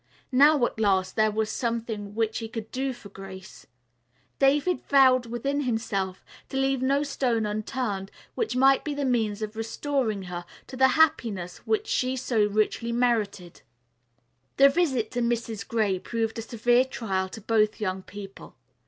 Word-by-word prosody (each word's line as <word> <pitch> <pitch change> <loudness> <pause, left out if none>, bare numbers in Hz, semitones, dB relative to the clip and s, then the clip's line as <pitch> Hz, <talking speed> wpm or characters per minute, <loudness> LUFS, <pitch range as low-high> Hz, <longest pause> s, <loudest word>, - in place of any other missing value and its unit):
Now, 280 0 +5
at 220 - -5
last, 190 -3 +1
there 215 -1 +3
was 215 0 -1
something 225 -4 -3
which 225 -1 0
he 225 - -5
could 225 -1 -7
do 265 +1 -1
for 240 -5 -11
Grace. 190 -1 -11 0.7
David 290 +6 +3
vowed 260 -3 +5
within 275 +5 -2
himself 220 -7 -2 0.2
to 270 - -4
leave 270 -1 +1
no 275 +2 +2
stone 245 -6 0
unturned 210 -1 -3 0.2
which 450 - -2
might 270 +1 +4
be 295 -2 -3
the 285 -1 -1
means 220 -4 0
of 215 0 -5
restoring 225 -1 -2
to 185 - -9
her 175 0 -5 0.2
the 265 0 +3
happiness 225 - +2
which 435 -1 +1
she 255 -7 0
so 245 -4 +1
richly 215 +3 0
merited. 220 -7 -1 1.0
The 275 +1 +8
visit 275 -8 0
to 245 - -2
Mrs. 235 -3 -2
Gray 210 -5 0
proved 225 +2 -3
a - - -2
severe 240 +2 +2
trial 195 -7 -2
to 220 - -9
both 215 0 +1
young 190 -3 -2
people. 195 -4 -11
230 Hz, 160 wpm, -26 LUFS, 210-260 Hz, 1.0 s, The